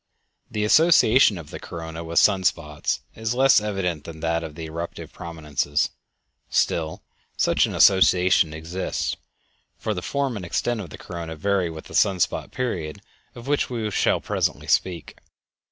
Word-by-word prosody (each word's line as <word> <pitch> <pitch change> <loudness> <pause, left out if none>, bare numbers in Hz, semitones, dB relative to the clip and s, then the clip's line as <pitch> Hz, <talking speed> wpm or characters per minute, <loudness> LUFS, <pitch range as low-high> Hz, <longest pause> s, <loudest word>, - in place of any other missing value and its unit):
The 105 - -2
association 135 - +5
of 80 -4 -10
the - - -7
corona 80 -1 -7
with 85 0 -5
sun 95 -3 +5
spots 75 -4 -1
is 110 +2 -3
less 135 -3 +5
evident 95 -7 -2
than 80 0 -9
that 85 0 0
of 80 -2 -7
the 80 - -7
eruptive 85 +2 -7
prominences; 75 -3 -2 0.6
still 80 -1 0 0.3
such - - +3
an - - -5
association 90 -3 +5
exists, 80 +4 -3 0.6
for 110 - -2
the 90 - -4
form 140 +3 -1
and 95 - -6
extent 115 +6 -1
of 90 - -8
the - - -10
corona 85 -2 -7
vary 95 +1 0
with 80 -1 -9
the - - -12
sun 95 -2 +3
spot 90 - 0
period 90 -12 -4 0.3
of 120 - -10
which 145 +1 0
we 115 -4 -3
shall - - +2
presently - - -2
speak. 90 -3 -1
90 Hz, 160 wpm, -24 LUFS, 80-105 Hz, 0.6 s, association